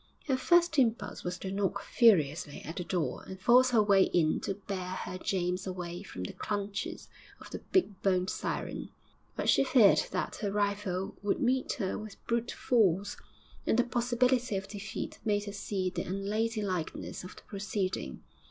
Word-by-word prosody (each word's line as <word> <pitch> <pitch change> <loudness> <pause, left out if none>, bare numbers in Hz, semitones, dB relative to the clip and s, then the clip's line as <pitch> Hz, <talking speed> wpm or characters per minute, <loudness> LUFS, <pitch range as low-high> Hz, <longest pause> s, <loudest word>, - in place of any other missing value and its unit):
Her 270 - +2
first 340 +3 +4
impulse 225 -4 0
was 180 0 -3
to 190 +1 -5
knock 200 0 0
furiously 160 - +3
at 160 +4 -7
the 180 - -2
door 170 -8 -2
and 190 - -8
force 250 +5 +6
her 230 -4 +4
way 200 -2 +5
in 160 -3 +2
to 195 - -3
bear 190 -2 -5 0.2
her 185 - -6
James 180 0 -1
away 175 -1 -5
from 95 - -7
the 90 - -5
clutches 205 -1 -4 0.3
of - - -12
the - - -5
big 210 - +2
boned 185 -1 +2
siren. - - -4 0.5
But - - -2
she - - +5
feared 245 -6 +6
that 185 - -3
her 205 -2 -2
rival 200 -2 -1
would 205 0 0
meet 260 -1 +1
her 195 -9 -2
with 215 -1 -10
brute 235 0 0
force, 205 -5 +2 0.5
and - - +3
the 245 - +5
possibility 245 -1 +1
of 195 0 -5
defeat 205 0 -6
made 205 -2 +1
her 200 -1 -6
see 195 -2 -2
the - - -3
unladylikeness 200 -3 -2
of 185 - -9
the - - -14
proceeding. 195 -2 -3
200 Hz, 170 wpm, -31 LUFS, 185-230 Hz, 0.5 s, force